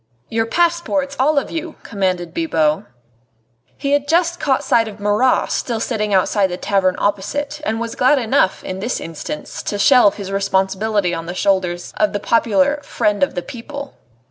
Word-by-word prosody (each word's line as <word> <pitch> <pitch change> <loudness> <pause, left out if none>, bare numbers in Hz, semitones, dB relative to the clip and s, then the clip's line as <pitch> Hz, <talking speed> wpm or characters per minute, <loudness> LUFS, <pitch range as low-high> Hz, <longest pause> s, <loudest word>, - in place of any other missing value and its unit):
"Your 225 0 0
passports, 330 -3 0
all 290 +3 +3
of 280 - 0
you," 325 0 -5
commanded 185 -4 -2
Bibot. 160 - +1 0.9
He 280 -1 -2
had 285 0 +2
just 340 +2 +2
caught 275 -1 +1
sight 230 -4 +2
of 210 -1 -9
Marat 210 +5 +2
still 235 -3 -1
sitting 215 -2 -2
outside 195 +1 +3
the 180 -1 -5
tavern 185 -2 +1
opposite, 285 +9 -2
and 225 -5 -1
was 230 -1 -4
glad 260 +4 +3
enough, 220 -6 +1
in 185 0 -5
this 235 +6 -2
instance, 155 -2 -6
to 205 - -3
shelve 240 -1 +5
his 195 -2 -6
responsibility 195 0 0
on 165 0 -4
the 175 - -5
shoulders 180 -3 0
of 210 -1 +2
the 205 - -1
popular 235 +7 +2
"Friend 205 -1 0
of 185 - +1
the 180 - -3
People." 280 +7 -8
215 Hz, 170 wpm, -19 LUFS, 190-280 Hz, 0.9 s, shelve